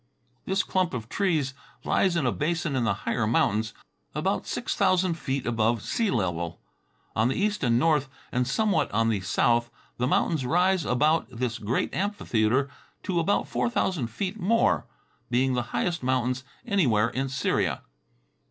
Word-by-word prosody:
This 195 +1 +1
clump 185 -6 0
of 115 -2 -6
trees 160 -9 0 0.3
lies 185 -3 +2
in 160 -5 +1
a 125 - +2
basin 165 0 -1
in 125 -3 +1
the - - +2
higher 115 -3 0
mountains, 110 -1 +1 0.4
about - - -1
six - - -2
thousand 185 -1 +3
feet 135 -5 -3
above 115 -1 +1
sea 230 -3 0
level. 85 - -1 0.6
On 110 +2 +3
the 130 - 0
east 210 -1 0
and 120 -2 +3
north, 150 -1 +2 0.2
and 125 0 0
somewhat 210 +9 +1
on 115 +1 +2
the 110 -3 +1
south, 120 +5 +2 0.3
the 125 - 0
mountains 150 +1 +1
rise 180 +5 +2
about 150 +3 +2
this 120 -1 -3
great 110 +4 -1
amphitheater 135 - +1 0.4
to 180 -3 0
about 170 +5 +1
four - - 0
thousand 180 - 0
feet 190 - -4
more, 220 +5 +2 0.4
being 130 +2 +2
the 125 - +1
highest 175 -1 -1
mountains 130 0 0 0.2
anywhere 120 - +2
in 135 +1 -2
Syria. 135 +1 0
130 Hz, 160 wpm, -26 LUFS, 120-175 Hz, 0.6 s, thousand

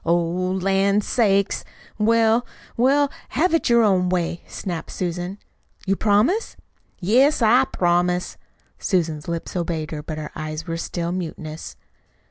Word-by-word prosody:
"Oh, 170 +1 +3
lan' 190 +3 +1
sakes! 200 -3 +1 0.4
Well, 225 +2 +3 0.3
well, 275 +4 +3 0.2
have 335 +6 +1
it 330 - +2
your 235 -1 +5
own 185 -4 +3
way," 175 -1 -1
snapped 175 -5 -5
Susan. 180 +2 -4 0.5
"You 195 0 +2
promise?" 220 - +2 0.4
"Yes, 250 - +3
I 245 +4 +5
promise." 180 -3 0 0.4
Susan's 165 -6 -1
lips 170 +1 -4
obeyed, 165 -3 -2
but 155 - -4
her 155 -1 -6
eyes 155 0 -5
were 165 0 -3
still 170 0 -3
mutinous. 160 -3 -6
185 Hz, 125 wpm, -22 LUFS, 170-220 Hz, 0.5 s, your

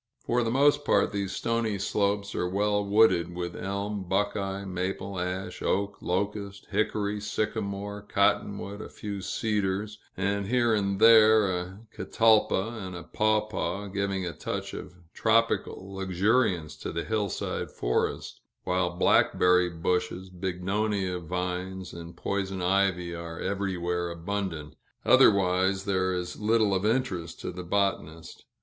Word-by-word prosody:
For 120 +1 +2
the 115 - 0
most 145 +4 +3
part, - - +2
these 100 -2 -2
stony 115 -2 -1
slopes 100 +1 0
are 90 - -1
well 105 +2 +1
wooded 100 -4 +3
with 85 -1 -4
elm, 100 +1 -3
buckeye, 100 0 -1
maple, 95 +1 -3
ash, 90 +1 -4
oak, 100 +1 -1
locust, 100 +2 -3
hickory, 105 -1 0
sycamore, 105 -1 -3
cotton 100 0 +1
wood, 100 +1 -7
a - - -8
few 100 -2 -6
cedars, 105 0 -1 0.2
and 100 +1 -1
here 120 0 +2
and 100 -2 0
there 110 -2 +7
a 90 +3 -6
catalpa 110 0 +2
and 95 -1 -6
a 85 - -7
pawpaw 105 -2 -1
giving 100 -1 -2
a 85 - -4
touch - - -5
of - - -8 0.2
tropical 110 -3 +1
luxuriance 95 -2 +1
to - - -5
the 85 - -3
hillside 105 -3 -2
forest; - - -2 0.2
while 90 -1 +1
blackberry 90 -1 +4
bushes, 90 +2 -2
bignonia 95 +1 -1
vines, 90 +2 -4
and 85 0 -9
poison 95 -1 -2
ivy, 90 -1 +1
are 85 -1 -7
everywhere 90 -3 -2
abundant; 85 -3 -4 0.3
otherwise, 95 0 +4
there 95 -2 +1
is 90 -1 -4
little 110 -1 +2
of 95 +2 +1
interest 95 -9 -1
to - - -4
the 90 +1 -7
botanist. 85 -4 -2
100 Hz, 130 wpm, -28 LUFS, 90-105 Hz, 0.3 s, there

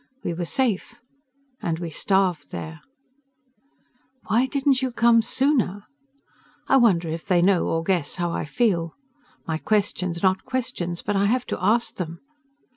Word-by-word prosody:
We - - -2
were 175 +1 -3
safe. 240 +1 -1 0.7
And 165 -1 -1
we 170 -1 -5
starved 180 -4 0
there. 160 0 -7 1.4
"Why 230 +5 +2
didn't 275 -1 +1
you 260 -1 -1
come 235 -1 +4
sooner?" 235 -5 0 0.8
I 270 - +5
wonder 190 -9 +3
if 160 +1 -5
they 180 -3 +3
know 180 0 +3
or 165 0 0
guess 170 -5 -1
how 175 -1 -2
I - - -3
feel. 170 -2 0 0.5
My 160 -1 -2
questions 190 -4 0
are - - +6
not 185 0 0
questions, 230 -10 -3
but 205 - -1
I 200 +1 +3
have 250 +3 +1
to - - -5
ask 230 +5 +2
them. 170 -2 -5
190 Hz, 155 wpm, -24 LUFS, 170-235 Hz, 1.4 s, are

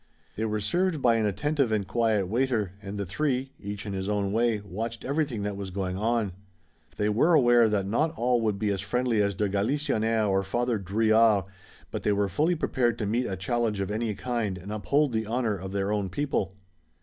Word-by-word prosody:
They 110 - -1
were 110 -1 -1
served 170 - 0
by 120 -3 +4
an 110 -2 +1
attentive 135 +5 0
and 105 -3 0
quiet 110 -5 +1
waiter, 115 -3 0
and 100 0 -6
the 100 - -2
three, 130 - -1
each 100 0 -6
in 100 - -4
his 95 +1 -3
own 100 -1 0
way, 115 -1 +2
watched 110 +4 -5
everything 140 -6 -1
that 100 0 -2
was 100 -1 -5
going 90 -1 -3
on. 110 0 0 0.7
They 105 - +1
were 125 +11 +4
aware 120 -5 +5
that 100 -2 0
not 135 +11 +1
all 120 0 +2
would 105 -3 0
be 105 0 0
as 95 -2 -2
friendly 120 +1 +1
as 100 -1 0
de 105 +2 0
Galisonnière 110 +1 +1
or 95 -1 +2
Father 120 +3 -1
Drouillard, 110 +1 +3 0.5
but - - -3
they 105 - +2
were 100 0 +1
fully 155 - +1
prepared 125 -7 0
to 105 - -2
meet 120 +5 0
a 95 - -3
challenge 110 +2 -1
of 100 +1 -2
any 110 0 -1
kind 115 -4 -2
and 95 +3 -8
uphold 140 +6 +1
the 110 -1 -1
honor 115 -2 0
of 95 0 -7
their 100 0 -1
own 100 -2 -1
people. 100 -5 -2
110 Hz, 210 wpm, -27 LUFS, 100-120 Hz, 0.7 s, aware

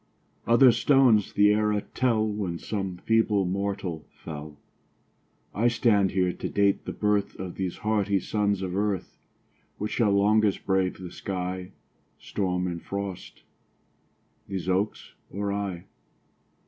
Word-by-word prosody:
Other 120 +2 +7
stones 125 -6 +4
the 105 0 +5
era 105 -1 +1
tell 115 -4 +2
When 100 -5 -3
some 95 -1 -4
feeble 110 -2 +2
mortal 95 -3 -3 0.2
fell; 75 -1 -8 1.0
I 115 +4 +2
stand 110 -5 +3
here 90 -1 +1
to - - -5
date 100 -1 +1
the - - -3
birth 105 -1 0
Of 95 -2 -5
these 95 -2 -4
hardy 105 -2 +1
sons 100 0 0
of 90 -1 -3
earth. 100 -2 -2 0.6
Which 105 +1 -3
shall 115 -4 +2
longest 105 +1 +3
brave 95 -1 +1
the 90 -2 -8
sky, 90 -1 -4 0.4
Storm 90 -2 -2
and 85 -2 -4
frost 100 -2 -6 1.0
these 95 -2 -4
oaks 95 +3 -1 0.2
or 100 +1 -3
I? 100 -4 -4
100 Hz, 130 wpm, -26 LUFS, 95-105 Hz, 1.0 s, Other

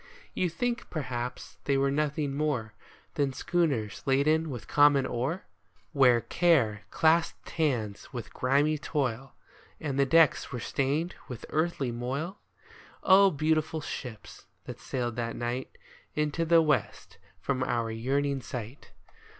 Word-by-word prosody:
You 180 - 0
think, 240 +9 -2
perhaps, 125 -5 -5
they 140 -1 +2
were 135 0 +2
nothing 150 0 -1
more 140 -8 -1 0.4
Than 140 -2 0
schooners 135 - -1
laden 155 +4 +3
with 125 -5 -7
common 145 -2 +5
ore? 130 +10 -2 0.5
Where 125 -5 +5
Care 135 -14 +2
clasped 165 +1 +1
hands 120 -11 -1
with 120 -4 -7
grimy 145 +4 +2
Toil, 135 -4 -2 0.4
And 140 -3 -3
the 140 - +4
decks 165 +1 +4
were 125 - -4
stained 140 +8 -1
with 125 -3 -7
earthly 155 -5 0
moil? 135 - -4 0.6
Oh, 195 +1 +7
beautiful 155 0 0
ships, 120 -7 -8 0.2
that - - -8
sailed 120 -2 -3
that 115 -1 -2
night 120 +2 -4 0.4
Into 150 +2 0
the 165 0 +5
west 150 -1 -1 0.2
from 130 -2 -2
our 115 -3 0
yearning 135 +4 -1
sight. 120 +2 -8
140 Hz, 130 wpm, -29 LUFS, 125-155 Hz, 0.6 s, Oh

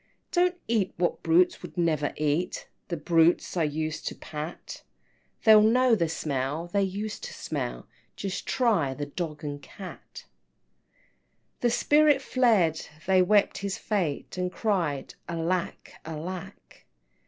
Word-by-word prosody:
XIII. - - -41
"Don't 360 0 +2
eat 220 -5 +1
what 175 0 0
brutes 175 +2 +3
would - - -10
never 155 -4 +1
eat, 155 +4 -1 0.2
The 170 - -3
brutes 165 +3 +3
I 175 - +1
used 155 0 -2
to - - -3
pat, 155 +2 -7 0.6
They'll 215 -1 +8
know 245 +3 +4
the 170 -7 +2
smell 145 0 -2
they 200 +3 0
used 205 - -3
to 485 - -7
smell, - - -4 0.3
Just 195 -2 -4
try 195 - +2
the 145 - -3
dog 155 0 -5
and 145 -1 -5
cat!" 190 +4 -10
XIV. - - -41
The 240 - +3
spirit 295 +3 +4
fled 215 -13 +2 0.2
they 190 0 +4
wept 205 +3 +3
his 195 -1 -3
fate, 185 -4 -2
And 180 0 -1
cried, 175 -12 -1 0.2
Alack, 170 +1 -2
alack! 165 +3 -8
180 Hz, 140 wpm, -27 LUFS, 155-210 Hz, 0.6 s, They'll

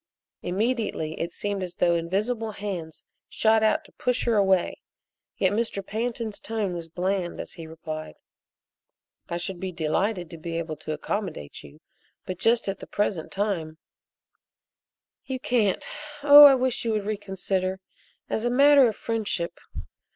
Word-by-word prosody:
Immediately 205 -5 -1
it 170 - -2
seemed 205 +1 -3
as 180 -1 -5
though 175 -1 +3
invisible 210 +7 -1
hands 185 -6 -5 0.3
shot 220 0 +3
out 220 - +2
to - - -18
push 250 0 -1
her 235 - +2
away, 190 -3 +2 0.6
yet 190 - +2
Mr. 205 -2 -2
Pantin's 225 0 -3
tone 215 -5 -2
was 170 -1 -6
bland 180 +1 -2
as - - -6
he 165 -2 -9
replied: 155 - -7 1.1
"I 170 - -2
should 175 +1 -4
be 190 0 -3
delighted 175 +3 -1
to 165 - -9
be 165 +1 -4
able 160 -2 -3
to 155 0 -5
accommodate 160 - -4
you, 70 - -15 0.4
but 185 -1 -5
just 230 -1 +2
at 195 0 -2
the - - -9
present 195 -5 -1
time 180 -6 -2 0.7
" - - -61
"You 260 -1 -3
can't? 225 -6 +1 0.4
Oh, 290 0 +11
I 275 -1 +9
wish 255 -1 0
you 230 -1 0
would 210 -2 -1
reconsider 190 -2 -2 0.5
as 220 - -2
a 240 - +2
matter 280 +1 +6
of 215 - -5
friendship. 210 -7 -2
195 Hz, 155 wpm, -26 LUFS, 170-225 Hz, 1.1 s, Oh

